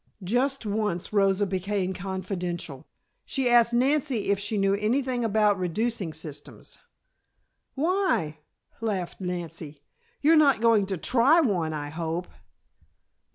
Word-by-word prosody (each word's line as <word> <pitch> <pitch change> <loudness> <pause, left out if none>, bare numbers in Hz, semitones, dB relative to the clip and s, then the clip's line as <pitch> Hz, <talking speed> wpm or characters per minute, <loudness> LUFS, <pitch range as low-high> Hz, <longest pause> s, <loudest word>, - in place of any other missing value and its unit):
Just 250 +6 0
once 210 -3 -2
Rosa 195 0 +3
became 190 0 -2
confidential. 180 -6 -5 0.4
She 265 -2 -1
asked 240 -1 +5
Nancy 255 -3 +1
if 200 - +1
she 205 +1 -2
knew 195 0 +2
anything 245 +4 0
about 210 -2 +2
reducing 195 +1 -1
systems. 155 -2 -10 1.0
"Why?" 275 - 0 0.4
laughed 195 -5 -3
Nancy. 165 -4 -5 0.4
"You 310 +3 +5
are - - +6
not 285 -5 +5
going 225 -4 +3
to 190 -1 -2
try 255 - +4
one, 185 - +1
I 145 -1 -4
hope." 165 +2 -3
200 Hz, 120 wpm, -26 LUFS, 180-240 Hz, 1.0 s, are